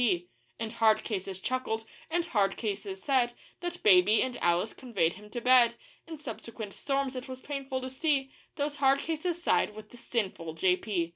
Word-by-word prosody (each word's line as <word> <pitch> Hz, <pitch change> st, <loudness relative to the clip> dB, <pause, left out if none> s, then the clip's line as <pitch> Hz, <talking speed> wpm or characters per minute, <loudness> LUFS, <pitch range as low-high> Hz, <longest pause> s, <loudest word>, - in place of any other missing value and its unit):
P. 180 Hz, -7 st, +1 dB, 0.3 s
And 225 Hz, -1 st, -4 dB
hard 220 Hz, -2 st, +4 dB
cases 190 Hz, -3 st, -4 dB
chuckled, 225 Hz, -1 st, -2 dB, 0.2 s
and 340 Hz, +1 st, +1 dB
hard 200 Hz, -, +1 dB
cases 200 Hz, -3 st, -4 dB
said 250 Hz, -3 st, +2 dB, 0.3 s
That 350 Hz, 0 st, -5 dB
Baby 200 Hz, +2 st, +6 dB
and 260 Hz, -1 st, -3 dB
Alice 175 Hz, +4 st, +1 dB
conveyed 195 Hz, -10 st, 0 dB
him 210 Hz, +2 st, -13 dB
to 240 Hz, -, -4 dB
bed 245 Hz, -1 st, +6 dB, 0.3 s
In 325 Hz, -1 st, -7 dB
subsequent 230 Hz, -6 st, -7 dB
storms 275 Hz, -1 st, -1 dB
it 255 Hz, +1 st, -5 dB
was 260 Hz, -1 st, -7 dB
painful 270 Hz, -2 st, -4 dB
to 260 Hz, -, -4 dB
see 270 Hz, -1 st, +1 dB, 0.2 s
Those 290 Hz, 0 st, -2 dB
hard 270 Hz, -1 st, +4 dB
cases 330 Hz, +3 st, -2 dB
side 210 Hz, -, +2 dB
with 215 Hz, 0 st, -11 dB
the 245 Hz, -, -12 dB
sinful 185 Hz, -9 st, -3 dB
J.P. 180 Hz, 0 st, +1 dB
235 Hz, 180 wpm, -30 LUFS, 200-270 Hz, 0.3 s, Baby